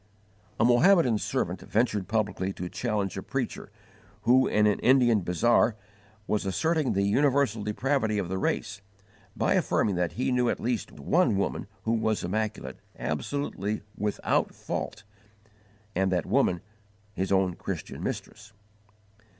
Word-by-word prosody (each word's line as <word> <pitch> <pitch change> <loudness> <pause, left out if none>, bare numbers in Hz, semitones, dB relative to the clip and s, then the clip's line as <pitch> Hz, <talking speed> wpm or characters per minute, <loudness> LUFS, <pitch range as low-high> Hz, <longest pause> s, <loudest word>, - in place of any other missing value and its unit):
A - - +4
Mohammedan 125 - +5
servant - - -2
ventured 105 -4 0
publicly 100 -3 -1
to 90 - -5
challenge 100 -1 -2
a - - -5
preacher - - -4 0.5
who, 130 +2 +5
in 105 0 +3
an 105 -1 +2
Indian 125 -4 +4
bazaar, 110 +6 +2 0.5
was 105 - 0
asserting 155 - 0
the 100 - +1
universal 135 +1 +2
depravity 110 +1 0
of 100 -4 -1
the 95 +1 -3
race, 105 +1 -2 0.6
by - - +2
affirming 105 - +1
that 90 -1 0
he 130 +2 -1
knew 125 -1 +2
at - - -1
least 120 -2 -2
one 115 - +1
woman 100 - -2 0.2
who 110 - 0
was 110 -2 0
immaculate, 100 -8 -3 0.2
absolutely 105 - -3
without 105 0 0
fault, 105 - -5 0.9
and 95 +1 +1
that 90 -3 0
woman, 90 -2 +2 0.5
his 95 0 -2
own 95 -2 +3
Christian - - -6
mistress. 105 +1 -6
105 Hz, 135 wpm, -27 LUFS, 95-120 Hz, 0.9 s, Mohammedan